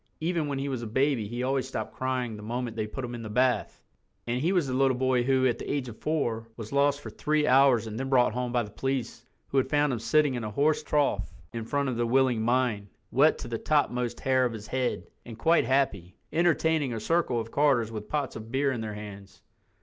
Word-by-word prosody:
Even 165 -1 -1
when 140 -1 -2
he 135 +1 -2
was 130 -4 -3
a 115 - -5
baby 130 -1 +1
he 120 +3 -4
always 130 0 0
stopped 135 - -5
crying 130 -3 -2
the 105 - -9
moment 120 +1 -4
they 110 -1 -2
put 130 +4 -5
him 120 - -7
in 120 - -6
the 110 - -6
bath. 125 +3 0 0.4
And 120 +2 -1
he 170 +5 +2
was 180 -5 +2
the 130 - -3
little 130 -1 +2
boy 130 -1 +2
who, 130 +1 +2
at 120 -2 +1
the - - -4
age 140 -3 -1
of 110 - -11
four, 120 -8 -1
was 110 -2 -7
lost 140 0 +2
for - - -8
three 150 0 0
hours 130 -4 +5
and 110 +1 -5
then 135 0 -3
brought 125 -4 +4
home 125 0 -2
by 120 -1 +1
the 105 - -10
police 130 -2 -3 0.3
who 135 - +2
had 130 - -1
found 145 -1 +2
him 120 - -2
sitting 145 +5 +2
in 120 -2 -3
a 110 - -3
horse 145 +8 +1
trough 145 -2 0 0.2
in 115 -1 -4
front 140 +3 -1
of 125 -3 -2
the 120 0 0
Willing 130 -2 +2
Mind, 120 -3 +1 0.2
wet 145 +5 +4
to - - -7
the 115 -1 -3
topmost 125 -5 0
hair 130 -1 +2
of 120 -2 0
his 110 -1 -8
head, 130 +1 -2 0.2
and 115 -2 -10
quite 165 +5 +3
happy, 115 -9 0 0.2
entertaining 160 -4 +2
a - - -3
circle 160 -2 +1
of 115 0 -6
carters 135 -6 +2
with 105 -1 -7
pots 145 -4 -2
of 110 +1 -8
beer 135 +1 +1
in 120 -4 -3
their 110 -1 -5
hands. 100 -2 -10
125 Hz, 240 wpm, -28 LUFS, 115-140 Hz, 0.4 s, hours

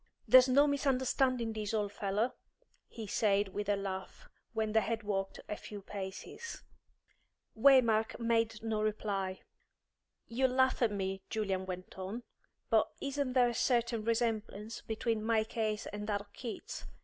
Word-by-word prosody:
"There's 255 0 +8
no 280 +3 +6
misunderstanding 260 -4 +1
this, 215 0 -2
old 205 -2 0
fellow," 205 +4 0 0.5
he 225 -2 -7
said, 205 -1 +2
with 205 +1 -4
a 205 - +4
laugh, 195 - -5 0.2
when 220 -2 -1
they 220 +1 +4
had 225 0 -2
walked 195 -2 -2
a 210 - -3
few 205 -1 -9
paces. 195 - -7 0.9
Waymark 230 -3 +5
made 225 -1 +1
no 220 -1 0
reply. 200 -3 -1 0.8
"You'll 260 +3 +1
laugh 260 0 +3
at 230 -3 +4
me," 195 -1 -2
Julian 195 -4 -1
went 185 +1 -7
on, 200 +6 -5 0.5
"but - - +5
isn't 275 -2 -2
there 250 -2 +5
a - - -3
certain 235 -2 +1
resemblance 225 -2 -1
between 225 0 -1
my 220 -1 +3
case 220 -1 -2
and 205 0 -5
that 205 -2 0
of 205 0 -17
Keats? 235 -4 -6
220 Hz, 150 wpm, -33 LUFS, 205-240 Hz, 0.9 s, There's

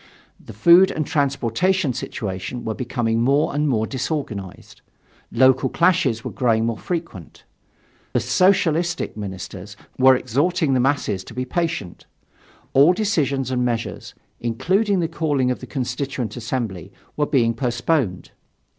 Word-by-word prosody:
The - - -11
food 170 - +6
and 155 - -2
transportation 140 - 0
situations 100 +3 -5
were 110 - -1
becoming 115 -2 -1
more 140 +5 +2
and 150 +1 +1
more 110 -4 +1
disorganized. 125 - -5 0.5
Local 130 +2 +4
clashes 165 -10 +2
were - - -5
growing 115 -3 +1
more 115 -2 -2
frequent. 165 - -6 0.7
The - - +2
"Socialistic" 175 -2 +1
ministers 100 0 -7 0.2
were 130 0 +7
exhorting 145 - 0
the 130 - +2
masses 125 -8 0
to 115 - -11
be 125 0 -2
patient. 160 - -3 0.7
All 145 +6 +6
decisions 145 - 0
and 125 -1 0
measures, 120 -2 -3 0.2
including 185 - +1
the 165 - 0
calling 145 -6 0
of 125 - -3
the 130 - -9
Constituent 125 -3 -3
Assembly, 115 -7 -4 0.2
were 150 -1 0
being 115 -4 +2
postponed. 120 - -1
130 Hz, 130 wpm, -21 LUFS, 115-160 Hz, 0.7 s, were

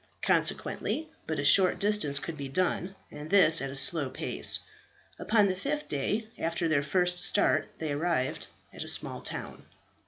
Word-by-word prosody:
Consequently, 315 0 -1 0.2
but 160 - -3
a 145 - -3
short 185 +5 +4
distance 205 -9 +1
could 160 +3 -5
be 140 -2 -7
done, 185 +5 -2 0.2
and 150 +1 -10
this 185 -5 +5
at 135 - -4
a 135 - -8
slow 140 0 +3
pace. 130 - +3 0.6
Upon 210 -2 +2
the 185 - -2
fifth 290 +10 -4
day 205 +10 -3
after 165 +1 -2
their 155 -3 +1
first 180 +4 0
start 200 - +2
they 155 -2 -4
arrived 145 -3 -2 0.3
at - - -7
a - - -11
small - - 0
town. - - -6
165 Hz, 165 wpm, -28 LUFS, 145-195 Hz, 0.6 s, this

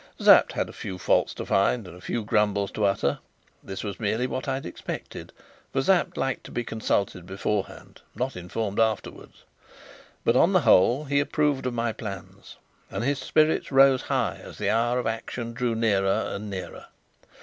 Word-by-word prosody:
Sapt - - +6
had - - -1
a - - -11
few 95 - -6
faults 90 - +2
to - - -5
find 100 +2 +1
and 90 - -11
a 90 - -14
few 115 +3 -3
grumbles 105 -2 +1
to 105 - 0
utter. 100 0 +1 0.4
This 95 0 -6
was 100 -1 -5
merely 110 +2 0
what 130 +1 -4
I 135 -1 0
expected, 90 -10 -7 0.4
for 135 - 0
Sapt 185 +3 +2
liked 135 -1 -1
to - - -10
be 120 - -2
consulted 100 -5 -2
beforehand, 100 +1 -4
not 130 +2 -2
informed 100 +4 -3
afterwards; 110 -2 -2 0.8
but - - +3
on - - +4
the - - +5
whole 120 +11 +4
he 140 0 +1
approved 145 -2 0
of 125 - -3
my 115 -1 -1
plans, 100 -3 -9 0.3
and 100 +3 -4
his 140 +2 0
spirits 155 -1 +1
rose 135 -1 +6
high - - -1
as - - -11
the - - 0
hour 120 +2 +1
of 125 - -2
action 115 +1 -4
drew 120 -1 -1
nearer 100 -4 +1
and 105 +1 -5
nearer. 95 -2 -7
115 Hz, 180 wpm, -26 LUFS, 100-130 Hz, 0.8 s, Sapt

